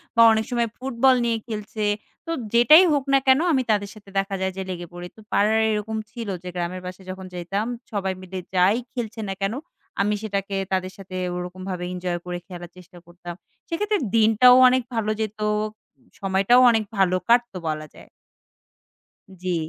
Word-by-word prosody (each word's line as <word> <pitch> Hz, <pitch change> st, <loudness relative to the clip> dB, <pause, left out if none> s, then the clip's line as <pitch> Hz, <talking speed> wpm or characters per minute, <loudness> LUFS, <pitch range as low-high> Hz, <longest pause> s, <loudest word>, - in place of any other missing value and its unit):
বা 230 Hz, -, +5 dB
অনেক 220 Hz, 0 st, +1 dB
সময় 235 Hz, -1 st, +1 dB
ফুটবল 260 Hz, 0 st, +3 dB
নিয়ে 230 Hz, -1 st, +1 dB
খেলছে 215 Hz, -1 st, -5 dB, 0.4 s
তো 330 Hz, -, -4 dB, 0.2 s
যেটাই 275 Hz, +10 st, +8 dB
হোক 280 Hz, -2 st, +1 dB
না 275 Hz, -, +6 dB
কেন 265 Hz, +2 st, +6 dB
আমি 260 Hz, -, +2 dB
তাদের 200 Hz, -1 st, 0 dB
সাথে 200 Hz, -2 st, -15 dB
দেখা 195 Hz, 0 st, -2 dB
যায় 190 Hz, 0 st, 0 dB
যে -, -, -2 dB
লেগে 175 Hz, -1 st, -5 dB
পড়ি। 175 Hz, 0 st, -7 dB
তো -, -, -17 dB
পাড়ার 215 Hz, +2 st, +3 dB
এরকম 215 Hz, +1 st, -2 dB
ছিল 230 Hz, -3 st, -6 dB, 0.2 s
যে 180 Hz, -, -6 dB
গ্রামের 180 Hz, +1 st, -3 dB
পাশে 185 Hz, +1 st, -8 dB
যখন 190 Hz, 0 st, -7 dB
যাইতাম 195 Hz, +5 st, -3 dB, 0.3 s
সবাই 195 Hz, -3 st, -1 dB
মিলে 185 Hz, 0 st, -6 dB, 0.2 s
যাই 185 Hz, +4 st, +4 dB, 0.2 s
খেলছে 230 Hz, -3 st, -5 dB
না -, -, -1 dB
কেন 195 Hz, +3 st, 0 dB, 0.5 s
আমি 210 Hz, +1 st, +1 dB
সেটাকে 200 Hz, -2 st, -3 dB, 0.2 s
তাদের 185 Hz, 0 st, -1 dB
সাথে 190 Hz, -1 st, -10 dB, 0.2 s
ওরকমভাবে 180 Hz, 0 st, -5 dB
এনজয় 180 Hz, -1 st, -3 dB
করে 180 Hz, 0 st, -4 dB
খেলার 175 Hz, -2 st, -9 dB
চেষ্টা 180 Hz, 0 st, -15 dB
করতাম 175 Hz, 0 st, -9 dB, 0.4 s
সেক্ষেত্রে 415 Hz, +5 st, 0 dB, 0.2 s
দিনটাও 225 Hz, +3 st, +6 dB
অনেক 255 Hz, 0 st, +3 dB
ভালো 215 Hz, -1 st, 0 dB
যেত 215 Hz, 0 st, -4 dB, 0.8 s
সময়টাও 195 Hz, +6 st, +4 dB
অনেক 220 Hz, -1 st, +1 dB
ভালো 185 Hz, -1 st, +3 dB
কাটতো 235 Hz, -5 st, +3 dB
বলা 155 Hz, 0 st, -4 dB
যায়। -, -, -15 dB, 1.3 s
জি। 180 Hz, -1 st, -1 dB
200 Hz, 170 wpm, -23 LUFS, 185-230 Hz, 1.3 s, যেটাই